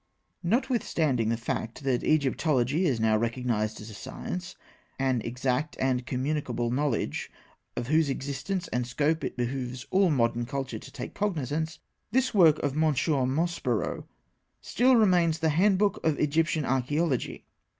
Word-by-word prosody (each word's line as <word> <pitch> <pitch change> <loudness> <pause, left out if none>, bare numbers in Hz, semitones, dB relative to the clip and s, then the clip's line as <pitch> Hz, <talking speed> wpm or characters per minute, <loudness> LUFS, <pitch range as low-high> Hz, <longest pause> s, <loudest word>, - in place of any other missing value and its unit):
Notwithstanding 170 - +1
the 115 - +1
fact 115 +3 -4
that 130 -3 0
Egyptology 145 +1 +2
is 125 -6 0
now 110 -1 +3
recognised 115 -1 -1
as 110 +1 -9
a - - -10
science, 175 - -6 0.4
an 130 -3 +1
exact 125 +5 -1
and 130 -1 0
communicable 125 -3 -1
knowledge 135 -2 -1 0.5
of 120 - -2
whose 155 +3 +2
existence 140 +7 -3
and 125 -1 -1
scope 150 +6 0
it - - -4
behoves 125 0 -3
all 190 -1 +4
modern 120 -4 +1
culture 135 0 -4
to - - -12
take - - -7
cognisance, 160 - -2 0.3
this 255 +2 +2
work 165 -7 +6
of 140 -2 0
M. 155 - -2
Maspero 145 -3 0 0.5
still 255 +2 +3
remains 180 -7 +4
the 160 0 +1
Handbook 195 +5 +2
of 160 -2 +2
Egyptian 155 0 +1
Archaeology. 135 +2 -1
140 Hz, 140 wpm, -28 LUFS, 125-165 Hz, 0.5 s, work